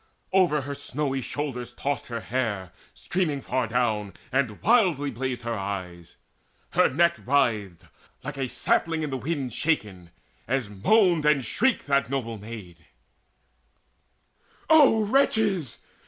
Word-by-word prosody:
Over 175 Hz, -6 st, +3 dB
her 140 Hz, +1 st, -5 dB
snowy 135 Hz, -1 st, -3 dB
shoulders 130 Hz, -2 st, -4 dB
tossed 145 Hz, +1 st, -3 dB
her 115 Hz, -1 st, -4 dB
hair 105 Hz, -8 st, -2 dB, 0.2 s
Streaming 175 Hz, -6 st, -2 dB
far 130 Hz, -2 st, -1 dB
down, 110 Hz, -3 st, 0 dB, 0.2 s
and 130 Hz, -6 st, 0 dB
wildly 180 Hz, -, +3 dB
blazed 125 Hz, 0 st, -4 dB
her 120 Hz, 0 st, -2 dB
eyes. 95 Hz, -5 st, -6 dB, 0.5 s
Her -, -, +4 dB
neck 170 Hz, +5 st, +2 dB
writhed, 110 Hz, -10 st, +1 dB, 0.4 s
like 150 Hz, -, -5 dB
a 135 Hz, -2 st, -3 dB
sapling 160 Hz, +5 st, 0 dB
in 150 Hz, -, -3 dB
the 135 Hz, -, -2 dB
wind 135 Hz, -3 st, -3 dB
Shaken, 105 Hz, -, -1 dB, 0.4 s
as 125 Hz, -4 st, -1 dB
moaned 170 Hz, -, +3 dB
and 140 Hz, -4 st, +3 dB
shrieked 265 Hz, -2 st, +1 dB
that 140 Hz, -2 st, +1 dB
noble 115 Hz, -5 st, -3 dB
maid: 100 Hz, -7 st, -10 dB, 1.8 s
"O 275 Hz, -9 st, +6 dB
wretches! 210 Hz, -, +2 dB
135 Hz, 125 wpm, -26 LUFS, 110-155 Hz, 1.8 s, O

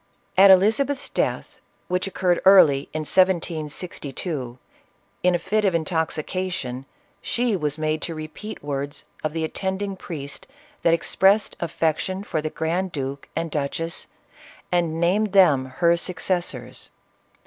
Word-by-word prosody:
At 195 Hz, +1 st, +8 dB
Elizabeth's 225 Hz, +9 st, +4 dB
death, -, -, -2 dB, 0.3 s
which 180 Hz, +1 st, -1 dB
occurred 180 Hz, -2 st, +1 dB
early 155 Hz, -8 st, +6 dB
in 155 Hz, -, -3 dB
1762, 155 Hz, -5 st, -1 dB, 0.6 s
in 180 Hz, 0 st, +3 dB
a -, -, +3 dB
fit 215 Hz, +5 st, 0 dB
of 190 Hz, -4 st, +2 dB
intoxication, 160 Hz, -4 st, -2 dB, 0.3 s
she 240 Hz, -3 st, 0 dB
was 150 Hz, -4 st, -1 dB
made 155 Hz, 0 st, -1 dB
to 165 Hz, -, -3 dB
repeat 155 Hz, +7 st, -7 dB
words 145 Hz, 0 st, -4 dB, 0.2 s
of 155 Hz, -1 st, -1 dB
the 165 Hz, -1 st, -2 dB
attending 190 Hz, +4 st, -2 dB
priest 145 Hz, -6 st, -7 dB, 0.3 s
that 165 Hz, 0 st, +4 dB
expressed 195 Hz, +5 st, +2 dB
affection 170 Hz, +3 st, -1 dB
for 160 Hz, -6 st, -2 dB
the 155 Hz, -, -2 dB
grand 175 Hz, +4 st, -2 dB
duke 135 Hz, -1 st, -5 dB
and 165 Hz, -1 st, -2 dB
duchess 155 Hz, +4 st, -3 dB, 0.6 s
and 170 Hz, -2 st, +1 dB
named 195 Hz, +4 st, +1 dB
them 155 Hz, -9 st, +5 dB
her 170 Hz, +6 st, +2 dB
succes 180 Hz, 0 st, -1 dB
sors. 125 Hz, 0 st, -5 dB
170 Hz, 130 wpm, -23 LUFS, 150-190 Hz, 0.6 s, At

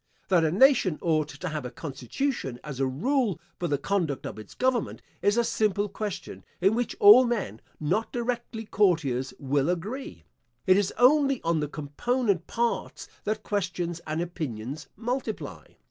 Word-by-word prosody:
That 180 Hz, -4 st, +4 dB
a 160 Hz, -, +3 dB
nation 205 Hz, -, +4 dB
ought 155 Hz, -3 st, +2 dB
to 180 Hz, -, -7 dB
have 155 Hz, -1 st, -4 dB
a 125 Hz, -, -4 dB
constitution, 135 Hz, -, -3 dB
as 140 Hz, -3 st, -7 dB
a 135 Hz, -, +2 dB
rule 210 Hz, -, 0 dB, 0.2 s
for 175 Hz, -, -1 dB
the 145 Hz, -3 st, +1 dB
conduct 160 Hz, -3 st, -1 dB
of -, -, -6 dB
its 105 Hz, -, -12 dB
government, 255 Hz, -3 st, 0 dB, 0.2 s
is 205 Hz, +3 st, +2 dB
a 235 Hz, -, +4 dB
simple 210 Hz, -2 st, +1 dB
question 205 Hz, 0 st, -6 dB, 0.2 s
in 195 Hz, +4 st, +4 dB
which 240 Hz, 0 st, -1 dB
all 210 Hz, +5 st, +9 dB
men, 210 Hz, -, -2 dB, 0.2 s
not 180 Hz, +9 st, 0 dB
directly 235 Hz, -2 st, -3 dB
courtiers, 160 Hz, -12 st, +1 dB
will 140 Hz, +1 st, 0 dB
agree. 185 Hz, -, -4 dB, 0.4 s
It 185 Hz, -, +6 dB
is 200 Hz, -1 st, +2 dB
only 275 Hz, +1 st, +5 dB
on 165 Hz, -1 st, +1 dB
the 150 Hz, -, -1 dB
component 180 Hz, -, -1 dB
parts 235 Hz, 0 st, -2 dB, 0.2 s
that 215 Hz, +1 st, -2 dB
questions 175 Hz, -4 st, -2 dB
and 155 Hz, +2 st, -1 dB
opinions 150 Hz, -5 st, -5 dB
multiply. 240 Hz, 0 st, -4 dB
185 Hz, 160 wpm, -27 LUFS, 150-230 Hz, 0.4 s, all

